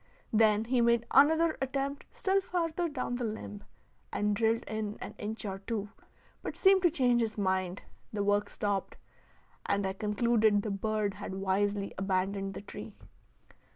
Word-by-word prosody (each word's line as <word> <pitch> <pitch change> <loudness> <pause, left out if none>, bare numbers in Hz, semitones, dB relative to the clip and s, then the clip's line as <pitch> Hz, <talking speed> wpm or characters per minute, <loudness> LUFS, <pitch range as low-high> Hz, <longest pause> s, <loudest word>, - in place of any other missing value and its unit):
Then 215 0 +4
he 245 +1 +2
made 235 0 +3
another 320 +3 +5
attempt 275 +1 -2
still 390 0 +1
farther 345 -2 -1
down 255 -4 -3
the 245 - -3
limb, 210 -2 -5 0.5
and 210 0 +1
drilled 225 +2 +2
in 215 -1 -4
an - - -7
inch 220 +1 -4
or 195 -1 -4
two, 210 0 -3 0.5
but - - -5
seemed 385 -1 +5
to 350 - +5
change 250 -6 +2
his 220 -1 -2
mind; 185 -2 -1 0.3
the 205 -1 -1
work 205 0 +2
stopped, 205 -2 -2 0.7
and 200 0 +1
I 190 - -1
concluded 210 0 +2
the 215 - -2
bird 210 0 -1
had 195 -1 -6
wisely 200 +1 0
abandoned 195 +1 -1
the - - -6
tree. 200 - -9
215 Hz, 155 wpm, -31 LUFS, 200-245 Hz, 0.7 s, another